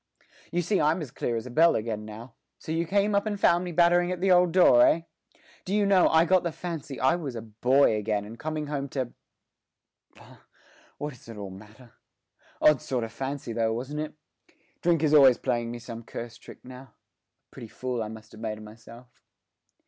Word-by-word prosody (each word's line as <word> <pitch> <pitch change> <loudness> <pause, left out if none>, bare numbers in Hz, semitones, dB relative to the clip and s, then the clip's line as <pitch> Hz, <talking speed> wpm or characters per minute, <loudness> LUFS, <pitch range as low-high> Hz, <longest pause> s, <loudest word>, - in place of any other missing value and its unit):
You 175 +1 0
see 195 +4 +1
I'm 155 +4 +2
as 135 - -9
clear 120 - -3
as 115 - -4
a 125 - -8
bell 165 +6 +4
again 110 -1 -3
now. 110 +3 -10 0.2
So - - -8
you 165 +1 -1
came 200 +3 +1
up 200 +2 +1
and 205 -2 -3
found 175 -2 +3
me 180 - -5
battering 175 +1 +3
at 180 - -3
the 190 +1 +2
old 180 -1 +5
door, 160 -9 +6
eh? 165 - +4 0.6
Do 195 +1 -2
you 210 -1 +2
know, 195 -2 +4
I 160 +1 +4
got 185 +1 +3
the 170 - -3
fancy 160 -6 -6
I 135 +4 +3
was 145 -8 -5
a 115 - -6
boy 120 +3 +2
again 105 -1 -2
and 115 +3 -11
coming 155 -1 -3
home 140 -1 -4
to 130 -3 -4 1.0
bah, - - -17 0.6
what 145 0 -5
does 120 - -17
all 105 -4 -7
that - - -10
matter? 110 +4 -16 0.7
Odd 150 -4 +4
sort 125 -3 -2
of 115 - -6
fancy 135 -1 -5
though, 115 0 0
wasn't 130 +6 -5
it? 155 0 -5 0.7
Drink 170 -2 +2
is 155 -1 +2
always 135 -4 +7
playing 120 -1 -2
me 120 - -5
some 115 -1 -8
cursed 115 0 -8
trick - - -14
now. 125 0 -10
A 130 -5 -19 0.6
pretty 115 - -10
fool 125 +1 -4
I 110 - -3
must 110 0 -11
have 110 - -13
made 110 -1 -3
of 110 - -11
myself!' 115 +2 -15
130 Hz, 210 wpm, -27 LUFS, 115-170 Hz, 1.0 s, always